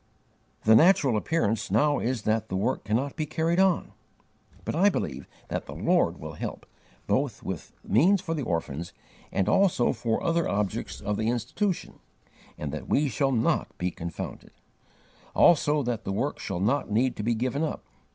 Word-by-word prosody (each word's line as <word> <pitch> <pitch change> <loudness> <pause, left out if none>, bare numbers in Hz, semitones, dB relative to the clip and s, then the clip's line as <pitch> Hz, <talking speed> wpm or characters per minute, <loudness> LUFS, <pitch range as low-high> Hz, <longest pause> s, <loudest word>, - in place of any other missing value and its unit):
The 110 - +6
natural 140 - +5
appearance 110 -3 0
now 145 -1 +3
is 120 -2 -2
that 110 0 0
the - - -2
work 105 +6 -1
cannot 120 +7 -1
be 155 -2 -2
carried 165 +3 0
on. 190 -3 +2 0.7
But - - -2
I 195 +5 +5
BELIEVE - - -3 0.2
that - - -3
the - - -7
Lord - - +2
will - - -7
help, - - -6 0.4
both - - 0
with - - -5
means 175 - +4
for 175 -3 -3
the 155 - -2
orphans 85 - -3 0.4
and 95 - 0
also 185 -11 +3
for 115 -2 -1
other 170 0 +1
objects 100 -2 -2
of 105 +1 -2
the 110 +1 0
Institution, 125 - -2 0.6
and 75 -2 -4
that 75 - -6
we 145 0 +2
shall 135 +4 +1
not 115 -3 0
be 90 0 -1
confounded; 85 -2 -7 0.8
also 150 -3 +4
that 120 -2 -2
the - - -3
work 120 +9 -2
shall 95 -3 -4
not 120 +9 +1
need 120 +5 +1
to - - -3
be 115 +2 +1
given 130 +5 -1
up. 160 - -2
120 Hz, 170 wpm, -27 LUFS, 105-155 Hz, 0.8 s, The